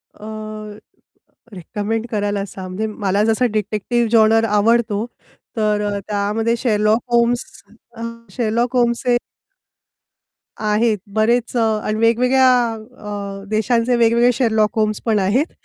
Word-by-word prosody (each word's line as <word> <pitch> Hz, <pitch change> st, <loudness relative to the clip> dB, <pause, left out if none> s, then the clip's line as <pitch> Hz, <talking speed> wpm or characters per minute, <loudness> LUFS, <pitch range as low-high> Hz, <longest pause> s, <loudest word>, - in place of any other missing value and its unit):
अ, 210 Hz, -, -12 dB, 1.3 s
recommend 210 Hz, +6 st, -3 dB
करायला 205 Hz, -2 st, -1 dB
सांग 185 Hz, -1 st, -8 dB
म्हणजे 205 Hz, +4 st, -3 dB
मला 205 Hz, -1 st, -1 dB
जसा 225 Hz, +3 st, +2 dB
डिटेक्टिव्ह 215 Hz, +3 st, -1 dB
जॉनर 225 Hz, 0 st, +4 dB
आवडतो 220 Hz, +1 st, +2 dB, 0.5 s
तर 210 Hz, -1 st, +1 dB
अ, -, -, -2 dB
त्यामध्ये 210 Hz, +3 st, 0 dB
"शेरलॉक 215 Hz, -2 st, +1 dB
होम्स 235 Hz, 0 st, +2 dB, 0.5 s
अ, 230 Hz, -, -7 dB, 0.3 s
शेरलॉक 240 Hz, +1 st, -1 dB
होल्म्स" 235 Hz, -1 st, +2 dB
हे 245 Hz, -1 st, +4 dB, 1.4 s
आहेत 215 Hz, +1 st, +1 dB, 0.2 s
बरेच 235 Hz, +3 st, +1 dB
अ, -, -, +2 dB, 0.2 s
आणि 215 Hz, +1 st, -2 dB
वेगवेगळ्या 250 Hz, +3 st, +4 dB, 0.2 s
अ, 205 Hz, -3 st, -8 dB
देशांचे 230 Hz, +3 st, +1 dB
वेगवेगळे 235 Hz, +1 st, +4 dB
"शेरलॉक 220 Hz, -2 st, +1 dB
होम्स" 215 Hz, -1 st, 0 dB
पण 220 Hz, -2 st, +2 dB
आहेत. 235 Hz, -, +1 dB
220 Hz, 120 wpm, -19 LUFS, 210-235 Hz, 1.4 s, जॉनर